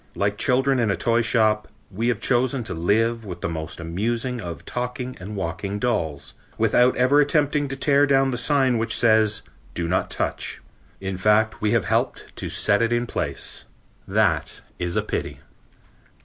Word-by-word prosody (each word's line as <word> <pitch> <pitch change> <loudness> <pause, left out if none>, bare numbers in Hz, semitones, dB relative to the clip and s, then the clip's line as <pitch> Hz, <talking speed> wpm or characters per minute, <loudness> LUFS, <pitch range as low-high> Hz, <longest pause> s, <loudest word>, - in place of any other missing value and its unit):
Like 100 +1 -1
children 130 +1 +3
in 115 -2 +1
a 100 - +2
toy 115 +7 +2
shop, 110 -2 +2 0.2
we 110 +5 -2
have 120 -4 +1
chosen 125 0 +1
to 115 - -5
live 115 +7 +1
with 90 -4 -8
the - - -1
most 80 +1 -5
amusing 115 +9 -2
of 85 -3 -7
talking 125 +1 -4
and 100 +3 -7
walking 100 +2 -3
dolls, 80 - -2 0.2
without 125 +1 +3
ever 130 +4 +4
attempting 145 0 +1
to 135 - -4
tear 140 +1 +3
down 135 -1 +3
the - - -2
sign 130 -1 +2
which 115 -1 0
says, 110 -2 +3 0.3
"Do 85 -1 -2
not 90 +2 0
touch." - - -3 0.4
In 95 -1 -4
fact 105 +3 +2
we 105 +1 +1
have 115 -5 +2
helped - - -1
to - - -4
set 100 +1 +2
it 115 0 +1
in 120 0 +1
place. - - -4 0.4
That - - +1 0.2
is 90 -1 -2
a - - +1
pity. - - -4
115 Hz, 175 wpm, -23 LUFS, 100-125 Hz, 0.4 s, ever